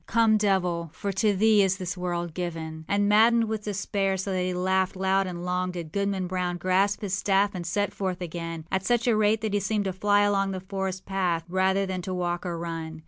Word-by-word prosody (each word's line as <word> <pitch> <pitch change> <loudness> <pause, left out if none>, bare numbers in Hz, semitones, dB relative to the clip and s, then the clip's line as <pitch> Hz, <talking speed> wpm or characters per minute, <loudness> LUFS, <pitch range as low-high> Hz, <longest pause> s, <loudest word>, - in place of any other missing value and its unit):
Come, 225 -2 +4
devil; 180 -5 0
for 200 - -3
to 205 +1 +1
thee 215 +1 +5
is 190 -1 +2
this 185 -2 -4
world 175 -2 -3
given.â 160 -2 -5
And, 205 0 +1
maddened 225 +3 +5
with 220 -1 -3
despair, 195 -1 -1
so 195 +1 -3
that 185 - 0
he 180 0 -1
laughed 185 +1 0
loud 190 +1 +1
and 175 -1 -5
long, 180 0 -1
did 170 -3 -6
Goodman 200 -1 -1
Brown 180 -1 -2
grasp 190 +3 +1
his 195 -3 -1
staff 195 +2 +2
and 175 -3 -5
set 205 +3 -1
forth 185 -2 -3
again, 165 -2 -5
at 190 0 0
such 240 +2 +1
a 235 - +4
rate 215 +1 +2
that 220 -2 -2
he 205 - +2
seemed 205 +1 -1
to 190 - -1
fly 205 +2 +3
along 195 -1 +1
the 185 - -3
forest 190 0 -4
path 180 -4 0
rather 190 +2 +1
than 185 -1 -3
to 185 +1 -4
walk 175 0 -2
or 170 -1 -3
run. 165 -1 -5
190 Hz, 225 wpm, -26 LUFS, 180-200 Hz, -, thee